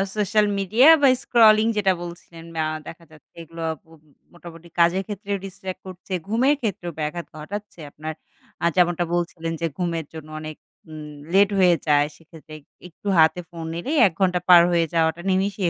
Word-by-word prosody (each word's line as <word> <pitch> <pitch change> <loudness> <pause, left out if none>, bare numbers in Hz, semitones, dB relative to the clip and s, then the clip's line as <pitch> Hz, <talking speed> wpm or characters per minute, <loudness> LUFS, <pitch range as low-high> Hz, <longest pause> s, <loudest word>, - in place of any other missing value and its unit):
Social 210 +1 +2
media 220 - +4
বা 280 - +6 0.2
scrolling 220 -2 +5
যেটা 195 -2 +3
বলছিলেন 170 -1 -11
ম্যা 160 -1 0 0.2
দেখা 170 +1 -10
যাচ্ছে 155 -1 -20
এগুলো 165 0 -9 0.2
পোম 160 -1 -20 0.3
মোটামুটি 170 -1 -13
কাজের 175 +3 +3
ক্ষেত্রেও 205 -1 -4
distract 190 -1 -8
করছে। 185 +1 -9
ঘুমের 255 +7 +2
ক্ষেত্রেও 185 -6 -3
ব্যাঘাত 155 +3 -3
ঘটাচ্ছে 200 +5 -8
আপনার, 155 +2 -6 0.5
আ - - +2
যেমনটা 175 -1 +2
বলছিলেন 170 -1 -3
যে 165 - +1
ঘুমের 170 -3 -2
জন্য 155 -1 -10
অনেক 155 -1 -7 0.4
উম 150 -1 -8 0.2
লেট 200 +1 +5
হয়ে 180 -2 +5
যায়। 145 0 +3
সেক্ষেত্রে 160 -1 -14 0.3
একটু 180 +4 -13
হাতে 160 +2 +4
ফোন 170 -1 -8
নিলেই 260 - -3
১ 180 - -6
ঘন্টা 180 -2 +2
পার 175 -1 +9
হয়ে 170 -1 +2
যাওয়াটা 165 +1 +1
নিমিষেই 190 -1 0
175 Hz, 165 wpm, -23 LUFS, 165-195 Hz, 0.5 s, পার